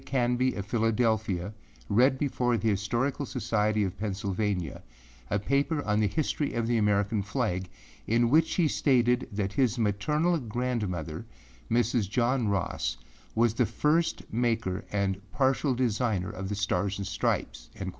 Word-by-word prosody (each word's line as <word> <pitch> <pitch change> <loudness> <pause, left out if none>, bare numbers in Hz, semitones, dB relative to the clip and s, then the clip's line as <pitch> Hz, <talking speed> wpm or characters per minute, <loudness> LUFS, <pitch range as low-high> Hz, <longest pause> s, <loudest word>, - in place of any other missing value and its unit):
Canby 125 0 +1
of 100 - -4
Philadelphia, 110 -4 0 0.3
read 130 +6 +4
before 125 -4 0
the 115 - 0
Historical 120 +8 0
Society 110 -4 0
of 95 -2 -2
Pennsylvania, 100 -4 -2 0.5
a 100 - +1
paper 140 +7 0
on 105 0 +1
the 105 - +3
history 145 +6 -1
of 115 -1 0
the 115 0 +1
American 105 0 +2
flag, 100 -4 -2 0.4
in 115 +1 +2
which 160 +2 +4
he 170 -4 +3
stated 125 -4 +2
that 100 -1 -2
his 125 0 +2
maternal 150 - +1
grandmother, 105 - -3 0.5
Mrs. 115 -3 +1
John 120 +1 +1
Ross, 85 -11 -1 0.4
was 115 0 +3
the 120 -1 +1
first 160 +3 +1
maker 115 -5 0
and 100 -1 0
partial 135 0 +1
designer 115 -6 0
of 95 +1 -5
the 105 - -2
Stars 100 -1 0
and 100 - -4
Stripes. - - -2
110 Hz, 140 wpm, -28 LUFS, 100-125 Hz, 0.5 s, read